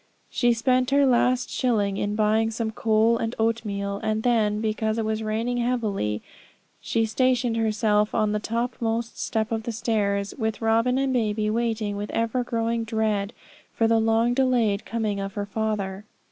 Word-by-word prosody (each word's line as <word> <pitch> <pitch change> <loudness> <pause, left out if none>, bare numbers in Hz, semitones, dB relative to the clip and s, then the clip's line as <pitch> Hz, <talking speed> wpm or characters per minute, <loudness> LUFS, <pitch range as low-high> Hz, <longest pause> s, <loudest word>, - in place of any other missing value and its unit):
She 240 -1 +2
spent 255 +2 +1
her 280 +1 +4
last 250 0 +2
shilling 205 -6 0
in 205 +1 -1
buying 220 +1 +2
some 225 0 -3
coal 225 +1 +2
and 225 +1 -2
oatmeal; 205 -3 -1
and 215 0 -1
then, 215 -4 +2
because 220 0 -1
it 225 - -1
was 220 0 -1
raining 225 +3 -1
heavily, 215 - -1 0.6
she 225 -1 0
stationed 245 0 +1
herself 215 -1 +1
on 215 -2 +2
the 210 - 0
topmost 230 0 -2
step 220 0 -1
of 225 -1 -1
the 235 - -4
stairs, 200 -3 -1
with 220 -1 -1
Robin 230 +3 +2
and 270 -1 +1
baby, 215 -3 0
waiting 220 -3 -1
with 205 +1 -4
ever 230 +2 0
growing 230 -1 -1
dread 220 -2 -1 0.4
for 225 - +2
the 225 0 +3
long 225 +2 +2
delayed 245 -6 +1
coming 215 -3 -2
of 195 +1 -5
her 205 -1 -2
father. 200 -2 -3
225 Hz, 165 wpm, -25 LUFS, 210-235 Hz, 0.6 s, her